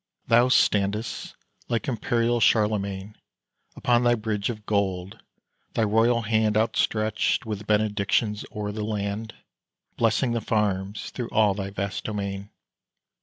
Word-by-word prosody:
Thou 120 +2 +5
standest, 105 -1 +1 0.3
like 115 - -1
imperial 120 -1 +1
Charlemagne, 105 -2 +1 0.6
Upon 120 0 +2
thy 120 0 +4
bridge 105 -2 -2
of 105 -3 -6
gold; 95 -2 -1 0.5
thy 115 - +2
royal 115 +3 +3
hand 110 -1 +2
Outstretched 110 0 +1
with 105 -1 -5
benedictions 105 0 +1
o'er 105 -1 -4
the 105 +1 -4
land, 105 +1 -3 0.6
Blessing 115 +2 +2
the 115 -1 -1
farms 100 -2 -1
through 120 -2 -5
all 105 -2 +3
thy 95 0 -4
vast 100 0 -4
domain. 100 -1 -4
105 Hz, 125 wpm, -25 LUFS, 100-115 Hz, 0.6 s, Thou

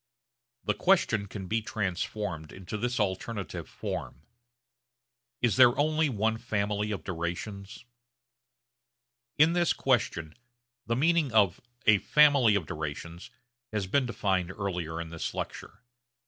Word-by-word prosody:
The - - +1
question 115 - +2
can 95 -1 -7
be 110 +4 0
transformed 95 -5 -3
into 95 +2 -7
this 120 +3 -1
alternative 100 -2 -3
form, 65 - -5 1.2
Is 120 -1 +3
there 125 0 +7
only 155 +1 +2
one 110 -1 0
family 105 -2 -1
of 100 -7 -4
durations? 95 +5 -5 1.5
In 160 +3 +5
this 175 -1 +2
question 100 -11 0 0.5
the 115 - +1
meaning 160 +1 +2
of 105 -5 +3 0.2
a 110 -2 +6
'family 140 -7 +5
of 95 -5 0
durations' 85 +1 -6 0.4
has 105 -3 -1
been 130 +7 +1
defined 95 -6 0
earlier 90 -4 -3
in 85 -1 -5
this 85 0 -4
lecture. - - -6
105 Hz, 120 wpm, -29 LUFS, 90-120 Hz, 1.5 s, there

